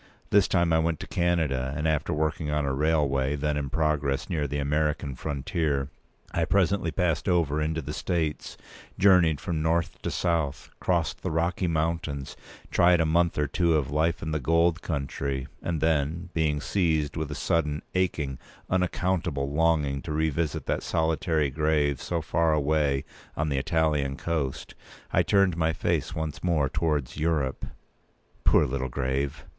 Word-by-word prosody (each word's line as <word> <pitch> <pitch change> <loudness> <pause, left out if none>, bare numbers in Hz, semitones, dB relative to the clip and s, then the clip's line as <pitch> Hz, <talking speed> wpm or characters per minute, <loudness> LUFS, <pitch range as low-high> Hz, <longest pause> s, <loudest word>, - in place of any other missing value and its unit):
This 100 -2 +5
time 85 -2 +2
I 80 - +4
went 80 -1 0
to - - -7
Canada, 75 -7 0
and 75 +1 0
after 80 -1 0
working 75 +1 -1
on 75 -1 0
a 70 - 0
railway 70 -2 +1
then 75 +1 -1
in 70 -2 -2
progress 75 0 0
near 75 -4 0
the 70 +1 -3
American 75 0 0
frontier, 70 +1 -2 0.4
I - - 0
presently 95 -2 +2
passed 85 0 0
over 80 -4 +2
into 80 +1 -1
the - - -5
States; 80 -4 -2 0.4
journeyed 90 -6 +5
from 85 -4 -2
north 80 +1 0
to - - -2
south; 80 -5 -1
crossed 85 -5 0
the - - -2
Rocky 85 +3 0
Mountains; 80 -4 -2 0.4
tried 90 0 +5
a 80 - +3
month 85 +2 +2
or 75 - +2
two 85 +3 +1
of 70 -2 0
life 80 +3 +1
in 80 - -3
the 75 - 0
gold 85 +3 +2
country; 70 -3 -3
and 80 -3 -2
then, 80 +2 0
being 75 -3 +1
seized 80 -7 0
with 80 -2 -3
a 75 - -4
sudden, 75 -2 0
aching, 80 -8 -1 0.3
unaccountable 90 -6 0
longing 75 -3 +1
to 80 - -6
revisit 80 0 -1
that - - -1
solitary 80 -2 0
grave 75 -2 +1
so 85 -2 -2
far 80 0 +2
away 75 -2 +1 0.3
on 80 0 0
the 70 -2 0
Italian 75 -2 0
coast, 80 -6 -3 0.4
I - - +5
turned 100 -4 +3
my 80 -1 +1
face - - -1
once 80 -1 -4
more 80 -6 +2
towards 75 -5 -1
Europe. 75 -5 -1 0.8
Poor - - +5
little 65 0 -2
grave! 70 +3 -2
80 Hz, 160 wpm, -27 LUFS, 70-85 Hz, 0.8 s, This